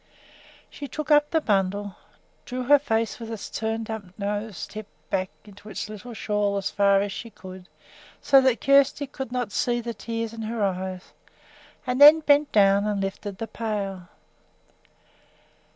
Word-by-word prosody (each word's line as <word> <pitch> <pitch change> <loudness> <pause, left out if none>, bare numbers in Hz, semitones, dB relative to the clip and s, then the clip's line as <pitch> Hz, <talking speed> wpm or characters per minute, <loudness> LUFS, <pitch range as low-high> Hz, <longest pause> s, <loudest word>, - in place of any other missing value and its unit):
She 285 - -7
took 305 +2 -5
up 295 0 +5
the 320 - +2
bundle, 200 -3 0 0.5
drew 255 0 -4
her 290 +3 +6
face 225 -6 -1
with 230 -1 -7
its 220 -3 -7
turned 225 0 -3
up 220 -2 -5
nose 205 -1 -4
tip 215 -1 -9 0.2
back 185 -1 0 0.2
into 205 0 -14
its 210 - -5
little 220 +3 -9
shawl 205 -1 -1
as 195 - -2
far 200 -1 +3
as 200 0 -2
she 230 - -7
could 185 -3 -12 0.5
so 270 -1 +5
that 260 -4 +2
Kjersti 275 +1 +3
should 265 -3 -5
not 245 -4 -2
see 240 +5 0
the 235 0 -5
tears 230 +2 -5
in 225 - -7
her 220 0 -3
eyes, 185 -1 -3 0.7
and 250 +1 -1
then 300 +2 +10
bent 290 -1 +3
down 200 0 +4
and 205 -1 -1
lifted 195 0 -4
the 225 - -4
pail. 205 -5 -4
220 Hz, 165 wpm, -25 LUFS, 200-245 Hz, 0.7 s, then